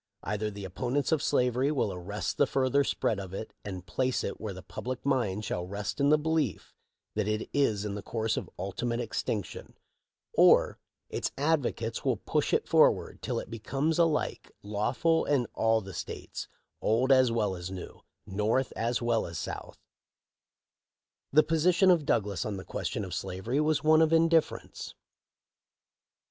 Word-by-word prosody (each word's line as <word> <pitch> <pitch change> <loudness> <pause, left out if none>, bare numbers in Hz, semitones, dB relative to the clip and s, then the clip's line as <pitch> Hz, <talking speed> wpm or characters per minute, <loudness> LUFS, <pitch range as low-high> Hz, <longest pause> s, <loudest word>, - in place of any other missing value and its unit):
Either 105 +1 -2
the 100 -1 -7
opponents 125 +9 -1
of 160 -3 +2
slavery 130 -1 +2
will 125 -9 0
arrest 95 +4 -4
the 145 - +4
further 135 +2 +2
spread 110 -5 0
of 95 -1 -7
it 110 - -6
and 95 -3 -6
place 130 +9 0
it 100 - -4
where 110 -2 -3
the 95 0 -9
public 130 +1 -6
mind 110 -7 0
shall 90 -3 -3
rest 100 +5 -4
in 140 0 +4
the 155 - +6
belief 155 - -1 0.4
that 105 -1 -1
it 105 0 -1
is 110 -8 +2
in 105 - -3
the 100 - -5
course 110 +1 -1
of - - -4
ultimate 115 +6 -2
extinction; 110 -4 -4 0.6
or - - +5 0.3
its - - -2
advocates 140 -6 0
wi - - 0
push - - +1
it - - +1
forward - - +3
till - - -2
it - - -9
becomes 135 +8 -1
alike 165 -3 +1
lawful 115 +11 +1
in 140 -4 +2
all 115 0 +2
the 95 -1 -9
states, - - -6 0.3
old 125 +5 +2
as 130 -2 +5
well 105 -4 0
as 90 0 -6
new, 95 -1 -8 0.2
North 105 +6 0
as 120 +2 -1
well 120 -1 +1
as 85 -2 -6
South" - - -6 1.5
The 155 +2 +6
position 175 +5 +4
of 165 -5 +2
Douglas 100 -5 +1
on 105 -2 -3
the 95 - -8
question 110 -7 -3
of 90 - -7
slavery 95 +9 -2
was 155 0 +1
one 155 +1 +6
of 160 0 +4
indifference. 165 -1 +1
115 Hz, 165 wpm, -29 LUFS, 100-140 Hz, 1.5 s, the